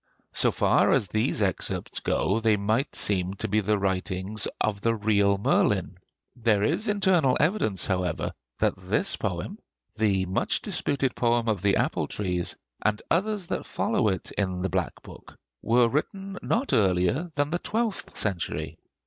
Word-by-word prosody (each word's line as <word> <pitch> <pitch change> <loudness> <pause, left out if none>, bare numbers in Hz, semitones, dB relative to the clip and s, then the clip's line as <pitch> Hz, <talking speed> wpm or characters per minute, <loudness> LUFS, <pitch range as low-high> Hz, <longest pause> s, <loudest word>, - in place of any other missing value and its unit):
So - - +4
far - - +3
as 100 - +1
these 110 +2 +1
excerpts 95 -3 -2
go, 100 +4 0
they 110 -2 +3
might 110 +7 0
seem 95 -1 0
to - - -3
be 105 +2 +2
the 105 +1 +1
writing 95 +1 -2 0.2
of 100 -2 0
the 115 +1 +2
real 100 -2 +2
Merlin. 100 - +1 0.4
There 110 -4 +2
is 180 - 0
internal 185 -10 +3
evidence 150 - +1
however 90 -4 -1 0.2
that - - +2
this - - -1
poem, - - -4 0.3
the 100 -4 +1
much 95 +1 -1
disputed 135 -3 -1
poem 120 -1 +1
of 105 -5 0
the 100 0 +3
'Apple - - 0
trees,' 90 -4 -2 0.3
and 105 0 +1
others 200 +2 +1
that - - -4
follow - - 0
it 95 -3 -2
in 95 -3 -2
the 95 - 0
'Black 90 0 -2
Book,' - - -13 0.2
were 120 +2 +4
written 195 - -3
not 255 +5 0
earlier 95 - +2
than 145 +1 0
the 175 - 0
twelfth 220 0 -3
century. 95 -5 -2
110 Hz, 155 wpm, -26 LUFS, 95-140 Hz, 0.4 s, So